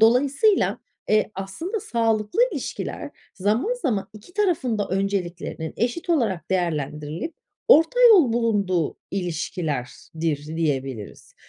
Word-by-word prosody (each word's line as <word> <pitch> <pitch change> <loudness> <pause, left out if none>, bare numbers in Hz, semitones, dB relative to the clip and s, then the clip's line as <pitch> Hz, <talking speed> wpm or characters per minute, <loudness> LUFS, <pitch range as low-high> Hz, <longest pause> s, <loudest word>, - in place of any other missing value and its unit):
dolayısıyla, 275 - +4 0.3
eee, 215 0 +3
aslında 260 - -4
sağlıklı 225 - 0
ilişkiler 280 - -5 0.2
zaman 215 - +1
zaman 240 - -1
2 215 +11 -14
tarafın 340 - +1
da 205 - -1
önceliklerinin 185 -4 -2
eşit 245 - -1
olarak 210 - 0
değerlendirilip 160 - -2 0.3
orta 330 +10 +6
yol 335 - +6
bulunduğu 200 -8 +1
ilişkilerdir 160 -3 -3
diyebiliriz. 135 -8 -3
205 Hz, 100 wpm, -24 LUFS, 165-260 Hz, 0.3 s, orta